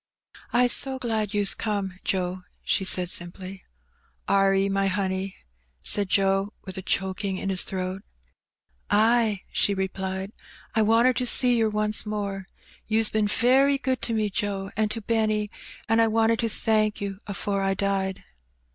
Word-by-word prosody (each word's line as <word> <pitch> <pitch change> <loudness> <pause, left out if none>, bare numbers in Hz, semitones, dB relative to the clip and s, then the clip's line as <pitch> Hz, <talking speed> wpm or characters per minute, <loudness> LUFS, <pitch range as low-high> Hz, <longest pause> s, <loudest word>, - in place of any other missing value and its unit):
I^s 245 0 +3
so 265 -1 +2
glad 220 -5 -2
you's 205 -1 +3
come, 200 -4 -3
Joe,'' 185 -1 -2 0.2
she - - +1
said 180 -1 +2
simply. 185 +2 -3 0.6
Are 195 0 +3
'e, 195 0 +2
my 195 0 0
honey?'' 190 0 -2 0.5
said 200 - +2
Joe, 195 +1 +1
with 190 -2 -7
a 190 - -5
choking 190 +1 -1
in 195 - -3
his 185 - +4
throat. 185 0 -3 0.9
"Ay," 220 -1 +3
she 200 - +2
replied; 190 0 -4 0.4
"I 220 - +2
wanted 230 +3 +3
to 250 - 0
see 245 0 +5
yer 225 -2 +2
once 210 0 +1
more. 200 -3 -4 0.4
You's 220 0 +3
been 215 -1 +1
very 265 +6 +3
good 260 -1 -2
to 230 - -1
me, 215 -2 0
Joe, 195 -1 -2
and 215 0 0
to 225 +1 -3
Benny, 215 -1 0 0.4
an' 225 +1 +2
I 225 - +5
wanted 225 +1 +2
to 230 - 0
thank 215 -1 0
you 195 -1 -5
afore 200 0 -2
I 195 0 0
died." 195 -1 -2
205 Hz, 160 wpm, -25 LUFS, 195-220 Hz, 0.9 s, see